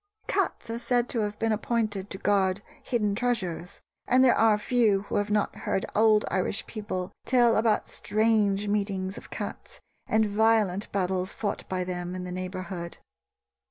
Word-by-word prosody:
Cats 225 - -1
are 230 - -3
said 245 0 +1
to 235 - 0
have 210 -1 -2
been 225 0 0
appointed 215 -3 -1
to 190 - -6
guard 195 0 +1 0.2
hidden 210 -5 0
treasures; 195 -7 -2 0.3
and 255 +1 +5
there 255 - +6
are 220 -1 +4
few 215 -3 +2
who - - -3
have 205 0 0
not 210 -1 0
heard 190 - -1
old 215 0 +4
Irish 190 +2 0
people 195 -4 -5
tell 240 -3 +4
about 220 -1 +2
strange 210 -2 +1
meetings 200 -2 -1
of - - -10
cats - - -7 0.3
and 220 0 +3
violent 210 -2 +2
battles 185 -1 -1
fought 205 -2 -4
by 185 -1 -1
them 180 0 -4
in 185 - -5
the 180 - -6
neighborhood. 185 -1 -5
205 Hz, 160 wpm, -27 LUFS, 185-225 Hz, 0.3 s, there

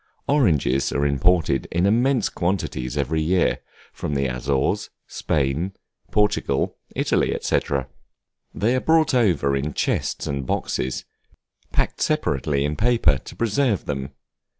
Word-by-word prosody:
Oranges 80 - +2
are 70 - 0
imported 70 -2 +2
in 85 +2 +1
immense 120 +4 +3
quantities 80 -8 -2
every 75 +3 0
year, 90 +3 +2 0.3
from 75 - -4
the 70 0 +1
Azores, 65 +2 -1 0.2
Spain, 75 +6 -1 0.4
Portugal, 105 0 +1 0.2
Italy, - - +1
&c. - - +2 0.9
They 115 +6 +1
are - - +2
brought 160 -2 +3
over 90 - +2
in 70 +2 -3
chests - - -1
and 70 -1 -2
boxes, 65 0 -2 0.7
packed - - -1
separately 70 - 0
in 75 +1 -2
paper 110 - +3
to - - -12
preserve 115 -2 +1
them. 70 -2 -3
80 Hz, 125 wpm, -23 LUFS, 70-105 Hz, 0.9 s, immense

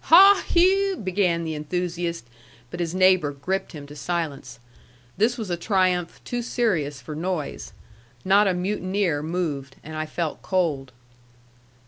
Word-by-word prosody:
"Haw, 390 +4 +8
hew!" 385 +2 +3
began 180 -3 0
the 160 -1 -3
enthusiast, 170 0 -3 0.5
but 175 - -6
his 170 0 -2
neighbor 185 -5 +4
gripped 180 +9 -3
him 145 -3 -8
to 145 +1 -12
silence. 145 -7 -4 0.6
This 235 +4 +2
was 215 -6 -4
a - - +1
triumph 180 -2 0
too 245 0 -2
serious 180 - -1
for 150 +4 -8
noise. 170 -1 -4 0.5
Not 200 +2 +5
a 185 - +1
mutineer 185 -3 -1
moved; 150 -5 -3
and 155 +1 -8
I 155 0 -3
felt 165 -1 -3
cold. 155 -8 -1
175 Hz, 140 wpm, -24 LUFS, 155-195 Hz, 0.6 s, Haw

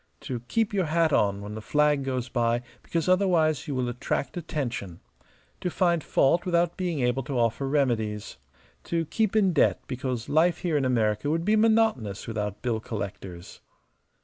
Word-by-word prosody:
To 125 -2 -4
keep 225 - 0
your 190 -3 +1
hat 160 -1 +2
on 100 -3 +2
when 105 +1 -7
the 110 - -6
flag 150 +3 +2
goes 130 -2 -2
by 120 0 0 0.2
because 165 0 -2
otherwise 180 -5 +2
you 145 - -2
will 125 -1 0
attract 125 +3 -3
attention. 125 - -4 0.6
To 180 - -2
find 170 -3 +1
fault 155 +6 +2
without 175 -1 +1
being 175 -6 -2
able 125 +2 +1
to 135 0 -4
offer 120 +3 0
remedies. 110 - -1 0.5
To 165 -1 -1
keep 220 +6 0
in 195 -4 +3
debt 155 - +3
because 125 -3 -4
life 165 +4 +3
here 170 -4 0
in 140 -2 +2
America 110 0 +1
would 165 +2 0
be 210 +2 +3
monotonous 220 - +2
without 105 -2 -4
bill 120 -3 0
collectors." 100 -5 -7
135 Hz, 170 wpm, -26 LUFS, 115-170 Hz, 0.6 s, in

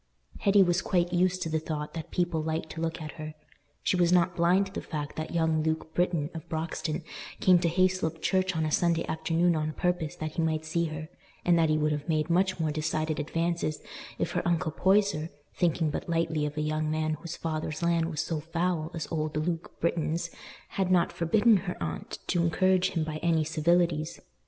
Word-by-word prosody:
Hetty 200 0 +5
was 175 0 +2
quite 175 -1 +1
used 180 +1 +2
to 165 - -3
the 160 0 +1
thought 150 -1 -4
that 165 -1 -6
people 175 -3 0
liked 160 0 -3
to 160 - -6
look 165 0 -2
at 155 -2 -6
her. 155 -1 -6 0.5
She - - +2
was 175 -1 +3
not 180 0 +3
blind 180 +3 +3
to 190 - -11
the - - -3
fact 150 -2 -5
that 155 - -4
young 160 -1 +2
Luke 160 0 -2
Britton 175 -3 0
of 165 -2 -8
Broxton 160 0 -3 0.4
came 180 -2 +6
to 170 - +1
Hayslope 185 -2 +1
Church 185 0 +1
on 160 -1 +1
a 155 - -1
Sunday 170 +1 +2
afternoon 165 +2 +1
on 155 0 -1
purpose 175 -3 -1
that 155 0 -4
he - - +2
might 160 -1 0
see 170 +2 0
her; 155 -1 -5 0.4
and 175 - +5
that 160 -1 +3
he 155 - +3
would 150 0 +1
have 150 +1 -3
made 155 +1 +1
much 185 +1 +2
more 160 -2 +1
decided 155 +1 -1
advances 165 0 -1 0.4
if - - -1
her - - 0
uncle 170 -2 +1
Poyser, 190 -3 +2 0.3
thinking 165 -3 +1
but - - -4
lightly 160 -2 +1
of 150 +1 -7
a - - +1
young 155 0 -1
man 155 0 0
whose 170 -1 -6
father's 155 0 -3
land 170 -1 +2
was 160 -2 -2
so 165 -1 -2
foul 165 0 -1
as 165 - -4
old 155 -2 -1
Luke 165 +2 -3
Britton's, 170 0 -1 0.4
had 190 -2 -1
not 175 -2 +4
forbidden 210 +6 +4
her 180 0 -4
aunt 80 -2 -4
to 175 - +1
encourage 185 +2 +3
him 165 - -1
by 155 -1 -4
any 165 -1 +2
civilities. 160 +1 +1
165 Hz, 205 wpm, -28 LUFS, 155-175 Hz, 0.5 s, came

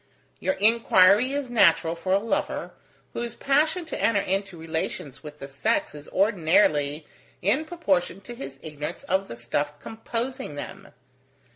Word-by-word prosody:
Your 285 - 0
inquiry 220 0 +5
is 280 -3 -3
natural 170 -7 +4
for 185 +2 -4
a 190 - +5
lover, 220 +3 -2 0.4
whose 235 0 -4
passion 310 +5 +1
to 320 - -5
enter 225 -3 +3
into 195 -1 -2
relations 160 -4 -4
with 150 -1 -10
the 140 - -8
sex 140 +1 0
is 150 0 -10
ordinarily 160 -6 +2 0.4
in 250 - +2
proportion 195 - 0
to 220 +5 -9
his 135 - -8
ignorance 150 -1 -6
of 190 +1 0
the - - -7
stuff 145 +5 -2
composing 230 - -4
them. 145 - -8
190 Hz, 145 wpm, -25 LUFS, 150-235 Hz, 0.4 s, inquiry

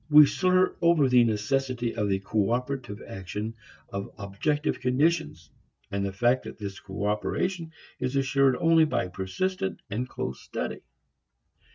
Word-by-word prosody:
We 150 0 +10
slur 185 +4 +2
over 170 -5 +5
the 125 -1 +6
necessity 120 +2 0
of 105 -3 0
the 95 - +2
cooperative 115 +3 -1
action 105 +4 -5 0.4
of 100 0 -4
objective 115 +11 -1
conditions, 130 - 0 0.4
and 100 0 -1
the 100 - -1
fact 120 +6 +2
that - - -8
this 100 -2 -6
cooperation 105 - -2 0.3
is 130 +1 -2
assured 135 -1 +3
only 165 -1 +5
by 120 -11 -1
persistent 185 - -2
and 125 +5 -2
close 65 0 -5
study. - - -4
125 Hz, 135 wpm, -27 LUFS, 100-150 Hz, 0.4 s, We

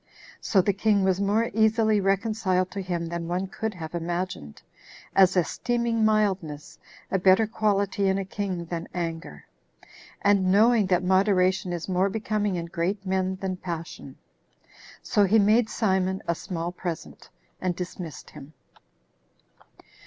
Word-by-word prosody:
So 195 - +2
the 200 - +1
king 200 0 +2
was 190 0 +1
more 215 +4 +1
easily 220 -1 +3
reconciled 195 -2 0
to 200 - -4
him 175 -2 -3
than 170 0 -4
one 180 +2 -1
could 215 +2 -4
have 160 -2 -7
imagined, 170 - -4 0.6
as 190 -1 +5
esteeming 235 +5 0
mildness 195 -9 0 0.3
a 190 - +1
better 190 +4 +5
quality 200 -2 0
in 190 - +1
a 195 - -3
king 185 -3 -4
than 170 0 -5
anger, 165 -1 -5 0.8
and 200 -2 +3
knowing 215 +1 +4
that 180 -1 +2
moderation 185 -1 +2
is 170 -2 -4
more 190 +1 +1
becoming 210 -1 -1
in 170 -1 -3
great 185 +4 -3
men 190 0 0
than 190 -1 -3
passion. 170 -2 -7 0.9
So 210 - +2
he 205 +4 +4
made 215 +2 +4
Simon 190 -3 0
a 170 - +2
small 170 0 -4
present, 175 -2 -7 0.3
and 180 -2 -1
dismissed 180 -3 -7
him. 145 +3 -12
190 Hz, 140 wpm, -26 LUFS, 180-205 Hz, 0.9 s, as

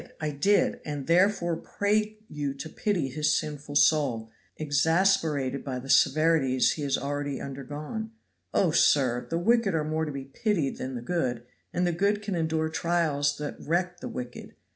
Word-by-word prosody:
I 155 -1 -2
did! 195 +9 +2
and 145 -3 -5
therefore 175 0 +3
pray 210 +4 -1
you 145 -2 -3
to 150 +3 -7
pity 185 -8 -1
his 150 +3 +1
sinful 145 -1 -5
soul, 140 -7 +3 0.3
exasperated 155 -2 +1
by 130 -2 -4
the 135 +2 -3
severities 150 -3 +4
he 155 - -4
has 140 -2 0
already 145 0 -3
undergone. 145 - -6 0.4
Oh, 180 -5 +2
sir! 130 -6 +3
the 165 - 0
wicked 220 0 +2
are 155 - +1
more 155 +1 -1
to 150 - -4
be 135 -1 -6
pitied 165 - -1
than 130 0 -4
the 120 - -5
good; 125 -7 -1 0.3
and 180 - 0
the 175 - +2
good 200 +4 +1
can 205 -1 -3
endure 160 -2 0
trials 155 -4 0
that 150 -1 -5
wreck 175 +2 -1
the - - -6
wicked. 125 -1 -7
155 Hz, 165 wpm, -27 LUFS, 140-175 Hz, 0.4 s, severities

